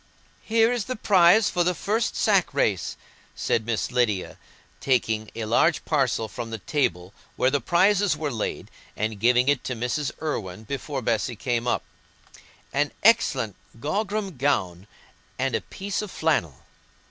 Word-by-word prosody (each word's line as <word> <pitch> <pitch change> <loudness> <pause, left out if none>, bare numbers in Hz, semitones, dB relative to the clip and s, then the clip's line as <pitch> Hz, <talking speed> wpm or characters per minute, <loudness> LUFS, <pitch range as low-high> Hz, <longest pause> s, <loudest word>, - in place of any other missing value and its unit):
"Here 225 +1 +3
is 245 -4 -1
the 255 - -3
prize 200 0 +5
for 175 - +1
the 180 +1 +1
first 215 +7 -1
sack 195 -9 +2
race," 100 -10 0 0.4
said 110 0 -1
Miss 115 +1 -1
Lydia, 120 -7 0 0.4
taking 110 -5 0
a 115 -1 -3
large 135 +9 +2
parcel 135 -7 +1
from 115 +1 -6
the 115 - -4
table 90 - -1 0.2
where 130 - +2
the 140 -1 +1
prizes 190 -1 +3
were 150 -1 -2
laid 110 -4 -4 0.3
and 110 -1 -2
giving 125 +3 +4
it 145 -3 +2
to 130 - -2
Mrs. 125 +5 -2
Irwine 110 - -4
before 135 +2 -4
Bessy 115 +2 0
came 120 +1 -2
up, - - 0 0.9
"an 145 +2 +1
excellent 135 - +3 0.2
grogram 195 - -2
gown 95 -9 0 0.5
and 130 0 -1
a - - 0
piece 200 +1 -4
of 210 - -6
flannel." 150 - -1
135 Hz, 150 wpm, -25 LUFS, 115-180 Hz, 0.9 s, prize